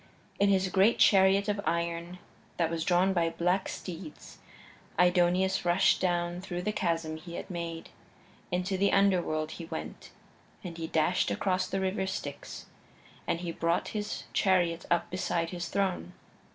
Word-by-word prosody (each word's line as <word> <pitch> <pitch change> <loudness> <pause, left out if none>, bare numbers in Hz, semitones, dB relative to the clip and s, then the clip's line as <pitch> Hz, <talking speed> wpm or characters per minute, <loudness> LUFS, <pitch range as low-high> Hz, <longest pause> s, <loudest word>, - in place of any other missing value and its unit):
In 200 0 +4
his 190 -1 +3
great 195 +5 +4
chariot 195 0 +5
of 205 -1 0
iron 170 0 -2 0.4
that 165 -1 +1
was 165 -1 -1
drawn 185 +3 +3
by 170 -2 +2
black 180 +3 0
steeds 170 -3 -8 0.6
Aidoneus 180 +1 +3
rushed 175 +2 +3
down 175 -1 0
through 180 -1 -5
the 210 - 0
chasm 165 -5 -1
he 170 +1 -9
had - - -6
made. 170 -2 -5 0.6
Into 180 +1 -1
the 200 +1 +3
Underworld 175 -6 +2
he 170 - -7
went, - - -7 0.5
and 175 -3 -6
he 165 -1 -4
dashed 160 +3 +1
across 185 -1 0
the 195 - -2
River 190 0 -1
Styx, 145 -6 -6 0.6
and 170 - -1
he 175 -1 -3
brought 170 +1 0
his 210 -1 -4
chariot 175 -3 +2
up 170 -1 +2
beside 170 -2 -1
his 175 -2 -4
throne. 185 - -1
180 Hz, 150 wpm, -29 LUFS, 170-190 Hz, 0.6 s, chariot